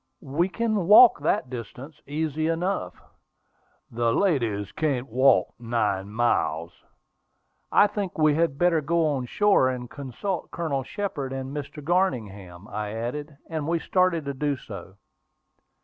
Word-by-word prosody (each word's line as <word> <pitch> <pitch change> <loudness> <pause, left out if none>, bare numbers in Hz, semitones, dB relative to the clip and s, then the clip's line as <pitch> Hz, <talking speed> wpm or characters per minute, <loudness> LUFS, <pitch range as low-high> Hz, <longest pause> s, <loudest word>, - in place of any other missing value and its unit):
"We 155 +7 0
can 215 -4 -1
walk 215 +1 +8
that 145 -3 0
distance 130 +5 -8
easy 155 +1 -1
enough." 175 +4 -2 0.9
"The 115 0 +1
ladies 115 - 0
can't 135 -5 -1
walk 130 +3 +3
nine 105 -4 -1
miles." 85 -8 0 1.0
"I - - +6
think 205 -3 -3
we 155 -1 +4
had 160 -2 +1
better 170 -1 +3
go 165 +2 +1
on 135 -5 -1
shore 200 -5 +3
and 125 -1 -4
consult 145 - -5
Colonel 155 -5 -2
Shepard 145 - -4
and 135 +1 -5
Mr. 145 0 -6
Garningham," 105 - -2
I 105 0 -4
added; 140 +6 -5
and 155 -3 -4
we 170 +1 +1
started 180 -2 +1
to 140 - -3
do 145 +1 -1
so. 100 -5 -10
145 Hz, 135 wpm, -25 LUFS, 120-165 Hz, 1.0 s, walk